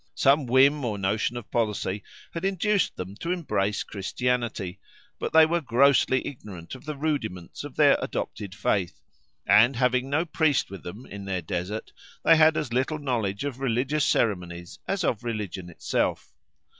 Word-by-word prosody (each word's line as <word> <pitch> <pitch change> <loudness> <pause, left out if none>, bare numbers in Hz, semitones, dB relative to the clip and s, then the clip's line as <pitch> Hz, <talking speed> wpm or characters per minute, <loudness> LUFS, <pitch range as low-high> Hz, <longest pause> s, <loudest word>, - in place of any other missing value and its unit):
Some 135 - +3
whim 135 +4 +4
or 110 -4 -2
notion 105 +5 0
of 120 - -9
policy 105 -3 -1 0.3
had 165 - -5
induced 195 +1 +1
them 95 +2 -6
to 170 - -3
embrace 105 - -1
Christianity; 110 -2 -2 0.4
but - - -3
they 160 0 +7
were 170 +2 0
grossly 130 0 +3
ignorant 100 -10 -9
of 130 +1 -10
the 150 -1 -4
rudiments 125 - -3
of - - -9
their - - +5
adopted 100 -3 -4
faith, 100 -4 -1 0.5
and 120 +5 +6
having 125 +1 +1
no 155 +4 +1
priest 155 - +1
with 95 -3 -8
them 100 +9 -9
in 100 0 -8
their 95 -3 -2
desert, 90 +6 -4 0.3
they 165 - +8
had 155 0 +5
as 130 -6 -2
little 135 +5 0
knowledge 115 -8 -2
of 140 -3 -4
religious 135 +4 0
ceremonies 90 -8 -1
as 195 -1 -1
of 115 -6 0
religion 105 -6 -4
itself. 85 - -2
120 Hz, 160 wpm, -26 LUFS, 100-145 Hz, 0.5 s, they